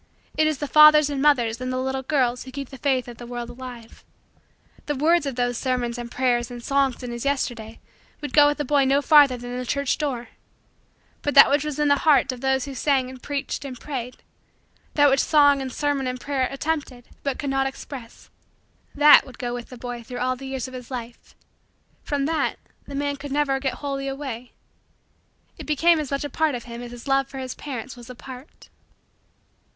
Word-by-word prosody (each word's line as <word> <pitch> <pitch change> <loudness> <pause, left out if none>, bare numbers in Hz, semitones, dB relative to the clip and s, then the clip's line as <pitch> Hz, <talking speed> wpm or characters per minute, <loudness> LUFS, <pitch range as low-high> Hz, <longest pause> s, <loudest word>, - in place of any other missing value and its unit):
It 310 0 +3
is 310 -2 0
the 290 - -4
fathers 305 0 +7
and 275 -1 -2
mothers 250 -5 +2
and 255 0 -3
the 255 - -2
little 265 +1 -2
girls 255 -3 0
who 260 - -10
keep 275 0 -6
the 270 - -11
faith 260 -3 0
of 240 -1 -9
the 240 - -8
world 240 0 -6
alive. 240 -2 -11 0.8
The 295 - -1
words 315 +2 +2
of 270 - -3
those 245 -1 -1
sermons 245 -2 -1
and 240 -1 -6
prayers 245 -1 0
and 240 -1 -9
songs 275 -2 0
in 245 - -5
his 235 0 -5
Yesterdays 240 -5 -2 0.4
would 290 -3 -6
go 295 -1 +7
with 290 - 0
the 295 - -2
boy 285 +1 +3
no 275 +2 +2
farther 285 -5 +6
than 245 +1 -7
the - - -3
church 280 +2 -1
door; 250 -6 -3 0.9
but 290 - -2
that 275 - +9
which 285 0 +3
was 300 -2 -4
in 295 -1 +2
the 285 0 +4
hearts 290 -3 +4
of 245 - -10
those 265 -1 +1
who 280 - -7
sang 265 -1 +1
and 260 -1 -12
preached 285 0 -4
and 260 -3 -7
prayed 250 -3 -6 0.7
that 290 -1 +6
which 270 -1 +3
song 285 -2 +4
and 260 -1 -4
sermon 285 -1 -1
and 255 0 -3
prayer 270 -1 -1
attempted 275 -4 -4
but 275 -2 -2
could 280 -2 -3
not 270 0 +1
express 265 -3 -10 0.6
that 295 +1 +8
would 260 - -13
go 245 -1 -3
with 240 -1 -6
the 250 - -10
boy 245 0 -6
through 245 +2 -8
all 255 +1 0
the 270 +1 -9
years 265 -2 -4
of 260 - -11
his 250 -2 -9
life. 240 -2 -8 0.7
From 285 -2 -2
that 320 +1 0 0.3
the 280 - -7
man 285 0 -1
could 285 0 -8
never 280 -1 +1
get 265 -2 -2
wholly 275 -1 -4
away. 265 -3 -6 1.1
It - - -8
became 320 +2 +3
as 295 -3 -4
much 275 0 -2
a 290 - -4
part 315 -2 +1
of 240 - -6
him 235 0 -8
as 245 - -7
his 240 +2 -11
love 270 0 +2
for 275 0 -10
his 260 -1 -5
parents 265 -3 -7
was 240 -1 -13
a 250 - -8
part. 260 +3 -12
265 Hz, 215 wpm, -24 LUFS, 245-285 Hz, 1.1 s, that